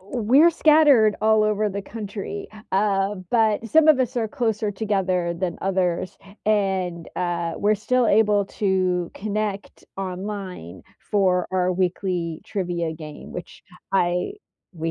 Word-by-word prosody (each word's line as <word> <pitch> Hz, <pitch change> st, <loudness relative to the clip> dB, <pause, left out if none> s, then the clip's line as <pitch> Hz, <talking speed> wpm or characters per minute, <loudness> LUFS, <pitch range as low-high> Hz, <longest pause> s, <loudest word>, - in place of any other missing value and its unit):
we're 245 Hz, -, +3 dB
scattered 295 Hz, -10 st, +5 dB
all 220 Hz, 0 st, +4 dB
over 215 Hz, 0 st, +1 dB
the 200 Hz, 0 st, -5 dB
country, 205 Hz, -2 st, -6 dB, 0.3 s
um, 195 Hz, -1 st, 0 dB
but 225 Hz, -1 st, +2 dB
some 315 Hz, +4 st, +5 dB
of 295 Hz, -4 st, +6 dB
us 250 Hz, -1 st, -1 dB
are 225 Hz, -2 st, 0 dB
closer 220 Hz, -3 st, -1 dB
together 190 Hz, -4 st, -1 dB
than 175 Hz, -1 st, -3 dB
others, 185 Hz, -2 st, -1 dB, 0.3 s
and, 190 Hz, -5 st, 0 dB
uh, 170 Hz, -2 st, -2 dB
we're 210 Hz, +1 st, +2 dB
still 245 Hz, +3 st, +1 dB
able 210 Hz, -1 st, +3 dB
to 185 Hz, -3 st, 0 dB
connect 210 Hz, -1 st, -4 dB
online 185 Hz, -, -6 dB, 0.3 s
for 185 Hz, -3 st, +2 dB
our 185 Hz, -1 st, +1 dB
weekly 180 Hz, -2 st, -2 dB
trivia 175 Hz, -4 st, -2 dB
game, 155 Hz, -2 st, -10 dB
which 175 Hz, -, -9 dB, 0.3 s
I 180 Hz, -, +1 dB, 0.4 s
we 165 Hz, -1 st, -3 dB
195 Hz, 130 wpm, -23 LUFS, 180-215 Hz, 0.4 s, of